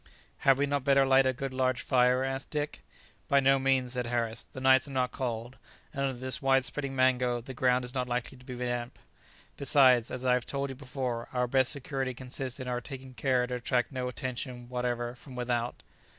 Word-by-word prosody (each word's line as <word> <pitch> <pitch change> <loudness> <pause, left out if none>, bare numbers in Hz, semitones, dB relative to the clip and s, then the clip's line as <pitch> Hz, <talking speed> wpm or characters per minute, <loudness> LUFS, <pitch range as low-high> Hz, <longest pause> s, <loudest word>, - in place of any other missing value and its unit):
"Had 135 -1 +4
we 140 - +2
not 140 -1 -1
better 140 0 +4
light 135 0 +5
a - - +3
good 130 +1 -5
large 130 -1 0
fire?" 125 0 +3
asked 135 0 -3
Dick. 150 -1 -3 0.5
"By 140 - +4
no 135 0 +4
means," 130 -2 +1
said 125 -2 -2
Harris; 115 -1 -1
"the - - -8
nights 130 +1 +5
are - - -8
not 130 -2 0
cold, 120 -1 -4 0.3
and 140 - -3
under 135 -1 -1
this 130 +3 +2
wide 135 -1 +3
spreading 140 -2 -3
mango 125 -2 +2
the 130 +3 -8
ground 125 0 +2
is 125 - -6
not 125 -2 -2
likely 125 +2 -2
to - - -16
be 125 0 -7
damp. 120 0 -3 0.6
Besides, 130 -4 +5
as 130 0 -5
I 125 - +4
have 125 -1 0
told 140 -1 -2
you - - -7
before, 125 -3 -4
our 125 -1 +1
best 130 +1 +2
security 135 -2 -3
consists 130 +1 -5
in 130 - -5
our 125 -1 -2
taking 135 -1 -9
care 125 +1 +1
to 125 - -5
attract 125 +1 0
no 130 -2 -3
attention 125 -1 -5
whatever 120 -1 -2
from 125 +1 -13
without." 120 -1 -2
130 Hz, 210 wpm, -30 LUFS, 125-135 Hz, 0.6 s, light